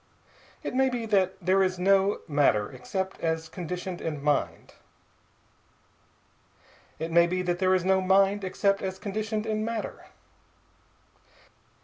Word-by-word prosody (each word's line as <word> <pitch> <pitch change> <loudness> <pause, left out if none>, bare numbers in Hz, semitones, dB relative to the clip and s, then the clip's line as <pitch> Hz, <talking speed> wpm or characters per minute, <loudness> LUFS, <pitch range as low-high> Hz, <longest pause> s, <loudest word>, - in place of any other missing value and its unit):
It - - -4
may 265 +1 +3
be 245 -2 -3
that 190 -3 +2
there 190 +1 +2
is 185 -1 +1
no 195 +2 +2
matter 145 -9 +2
except 190 +9 -4
as 160 -1 -1
conditioned 180 +1 -5
in 150 -3 -3
mind. 145 -1 -1 2.2
It 165 +1 -4
may 170 +1 +5
be 185 +1 -1
that 175 -1 -1
there 185 0 +3
is 185 -1 -1
no 190 0 +3
mind 195 +2 +3
except 195 +1 0
as 190 0 -4
conditioned 215 +2 -3
in 215 -1 -1
matter. 225 -1 -4
190 Hz, 130 wpm, -27 LUFS, 175-200 Hz, 2.2 s, may